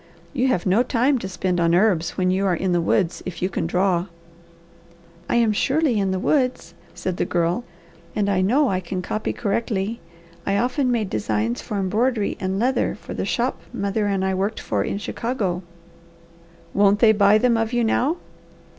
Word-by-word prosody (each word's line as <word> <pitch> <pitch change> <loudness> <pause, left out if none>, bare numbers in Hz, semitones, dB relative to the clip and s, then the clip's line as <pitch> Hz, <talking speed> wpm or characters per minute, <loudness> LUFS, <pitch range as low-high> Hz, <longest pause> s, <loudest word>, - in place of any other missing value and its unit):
You 260 -2 +1
have 185 -9 0
no 195 +5 +4
time 255 +2 +2
to 190 - -5
spend 180 -1 -1
on 170 0 +3
herbs, 180 -4 +2
when 185 0 +2
you 190 +1 +1
are 180 - +2
in 185 +1 -1
the 175 -1 +2
woods, 175 +1 +1
if 185 - -6
you 185 - 0
can 170 - -2
draw." 180 0 +1 1.2
"I - - +1
am 230 -2 +4
surely 270 +2 +1
in 195 -1 +1
the 190 - 0
woods," 250 - 0 0.2
said 175 +1 -3
the - - +1
Girl, 175 +5 0 0.5
"and 205 -1 +1
I 195 -2 +2
know 260 +10 +3
I 185 - 0
can 185 0 -5
copy 215 +4 -2
correctly. 215 0 -2 0.4
I 200 0 0
often 250 +3 +1
made 220 -5 -1
designs 110 +2 -1
for 210 - -4
embroidery 215 +3 0
and 190 0 -2
leather 250 +5 +1
for - - -9
the - - -3
shop - - -1
mother 200 +1 -1
and 195 -1 0
I 190 - 0
worked 195 +4 -1
for - - -1
in - - -2
Chicago." 205 -4 -2 1.1
"Won't 200 0 +4
they 220 +1 +6
buy 205 0 +5
them 240 +1 +3
of 225 0 0
you 240 -1 +1
now?" 270 +8 +1
200 Hz, 190 wpm, -22 LUFS, 185-235 Hz, 1.2 s, they